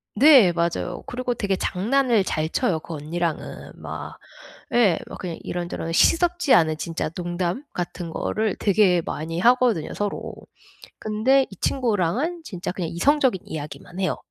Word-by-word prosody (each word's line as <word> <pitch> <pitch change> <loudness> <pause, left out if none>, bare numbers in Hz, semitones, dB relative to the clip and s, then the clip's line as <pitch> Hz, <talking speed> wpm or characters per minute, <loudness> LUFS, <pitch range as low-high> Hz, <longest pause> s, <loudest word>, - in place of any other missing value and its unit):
네 255 - +7
맞아요. 170 +1 -2
그리고 250 0 -2
되게 200 -4 -1
장난을 230 +4 +1
잘 155 0 -1
쳐요 185 -9 0
그 165 - -9
언니랑은. 160 +2 -4
막 - - -8 0.6
예 215 -8 +4
막 - - -8
그냥 175 -3 -5
이런저런 175 -1 -4
시덥지 345 - +3
않은 155 -2 +4
진짜 165 -1 -3
농담 175 - -3
같은 175 -1 -4
거를 215 +3 -1
되게 190 -4 +3
많이 165 +2 -4
하거든요 240 -6 +3
서로. 205 -1 -4 0.6
근데 245 +6 +2
이 195 - -11
친구랑은 250 - 0
진짜 180 - -5
그냥 180 -3 -4
이성적인 260 - +2
이야기만 160 +4 -8
해요. 185 - 0
185 Hz, 305 characters per minute, -23 LUFS, 170-245 Hz, 0.6 s, 네